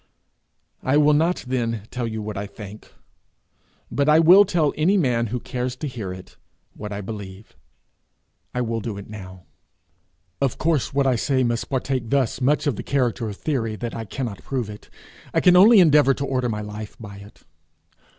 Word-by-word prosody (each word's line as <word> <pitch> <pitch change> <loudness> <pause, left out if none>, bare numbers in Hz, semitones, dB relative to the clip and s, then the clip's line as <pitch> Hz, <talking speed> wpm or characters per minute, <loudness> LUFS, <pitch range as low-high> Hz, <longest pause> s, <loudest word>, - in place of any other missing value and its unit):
I 130 +3 +2
will 150 0 +5
not 165 +4 +1
then 115 -4 -2
tell 125 -2 -3
you 110 -1 -4
what 105 0 -5
I 100 +1 -4
think, 105 +1 -11 1.0
but 140 +1 +1
I 150 - +6
will 180 +5 +7
tell 170 -6 +1
any 180 +7 +2
man 120 -8 +1
who 125 +4 -3
cares 125 +1 -4
to 150 - -5
hear 110 -8 -5
it 90 0 -11 0.4
what 105 -1 -7
I 100 0 -4
believe. 100 0 -9 1.0
I 125 - -2
will 115 -1 -2
do 110 -3 -5
it 100 - -9
now. 95 -3 -10 1.0
Of 135 -3 0
course 155 -5 0
what 140 0 +1
I 130 -2 +2
say 130 +2 +1
must 120 -1 -1
partake 130 -3 -2
thus 135 -2 0
much 145 +5 +2
of 140 -8 0
the - - -4
character 125 -4 0
of 100 - -8
theory 115 -8 -2
that 115 +2 -5
I 115 - -5
cannot 110 -1 -5
prove 125 -6 -3
it; 105 - -13 0.5
I - - +5
can 180 -1 +5
only 210 +4 +8
endeavour 150 -5 +5
to 140 - -3
order 130 -2 -1
my 105 -1 -3
life 105 0 -8
by 100 -3 -9
it. 100 +1 -15
125 Hz, 190 wpm, -23 LUFS, 105-140 Hz, 1.0 s, only